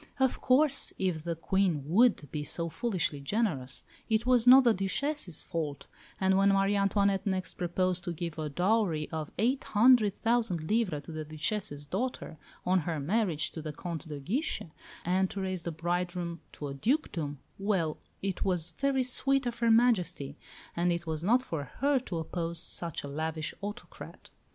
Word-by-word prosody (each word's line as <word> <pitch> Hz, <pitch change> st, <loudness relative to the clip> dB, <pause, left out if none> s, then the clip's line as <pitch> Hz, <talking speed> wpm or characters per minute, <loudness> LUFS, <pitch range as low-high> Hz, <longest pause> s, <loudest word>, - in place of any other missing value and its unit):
Of 265 Hz, -1 st, +2 dB
course, 275 Hz, +2 st, +3 dB
if 180 Hz, -5 st, -1 dB
the 170 Hz, -1 st, -1 dB
Queen 175 Hz, -3 st, +1 dB
would 185 Hz, -, +3 dB
be 150 Hz, -1 st, -3 dB
so 170 Hz, +2 st, -2 dB
foolishly 185 Hz, -, -1 dB
generous, 140 Hz, -, -1 dB, 0.3 s
it 220 Hz, +1 st, +2 dB
was 250 Hz, -2 st, +4 dB
not 260 Hz, +2 st, +10 dB
the 235 Hz, -2 st, +5 dB
Duchesse's 195 Hz, -, -2 dB
fault, 150 Hz, -4 st, -4 dB, 0.3 s
and 190 Hz, 0 st, +3 dB
when 195 Hz, +1 st, +5 dB
Marie 195 Hz, +1 st, +3 dB
Antoinette 200 Hz, 0 st, +2 dB
next 190 Hz, -1 st, -1 dB
proposed 180 Hz, +1 st, -1 dB
to 175 Hz, -, -2 dB
give 170 Hz, -1 st, -5 dB
a 155 Hz, -1 st, -2 dB
dowry 180 Hz, -1 st, +1 dB
of 155 Hz, -2 st, -4 dB
eight 245 Hz, +7 st, +1 dB
hundred 215 Hz, -2 st, +5 dB
thousand 225 Hz, -9 st, 0 dB
livres 195 Hz, -10 st, +1 dB
to -, -, -9 dB
the 155 Hz, 0 st, -4 dB
Duchesse's 155 Hz, -1 st, -3 dB
daughter 230 Hz, -, -3 dB, 0.3 s
on 185 Hz, +1 st, +3 dB
her 160 Hz, -1 st, -2 dB
marriage 170 Hz, 0 st, 0 dB
to 160 Hz, -, -6 dB
the 155 Hz, 0 st, -4 dB
Comte 170 Hz, +1 st, -6 dB
de 150 Hz, -2 st, -6 dB
Guiche, 235 Hz, -, -2 dB, 0.4 s
and 185 Hz, +2 st, +2 dB
to 200 Hz, -, -5 dB
raise 185 Hz, -2 st, -2 dB
the 170 Hz, -, -4 dB
bridegroom 175 Hz, 0 st, -2 dB
to 145 Hz, -, -6 dB
a 140 Hz, -, -5 dB
dukedom 160 Hz, -, -1 dB, 0.2 s
well, 190 Hz, -6 st, 0 dB, 0.2 s
it 195 Hz, -2 st, -1 dB
was 175 Hz, -3 st, 0 dB
"very 270 Hz, +6 st, +1 dB
sweet 270 Hz, +2 st, +1 dB
of 235 Hz, -1 st, -3 dB
Her 235 Hz, -1 st, +3 dB
Majesty," 180 Hz, -, +3 dB, 0.4 s
and 175 Hz, +1 st, +2 dB
it 170 Hz, 0 st, -2 dB
was 160 Hz, -1 st, -3 dB
not 245 Hz, +7 st, +4 dB
for 160 Hz, -, -4 dB
her 280 Hz, 0 st, +3 dB
to 190 Hz, -9 st, -5 dB
oppose 165 Hz, +1 st, -3 dB
such 165 Hz, -1 st, -2 dB
a -, -, -5 dB
lavish 155 Hz, +2 st, -3 dB
autocrat. 205 Hz, +4 st, -8 dB
180 Hz, 175 wpm, -30 LUFS, 160-225 Hz, 0.4 s, not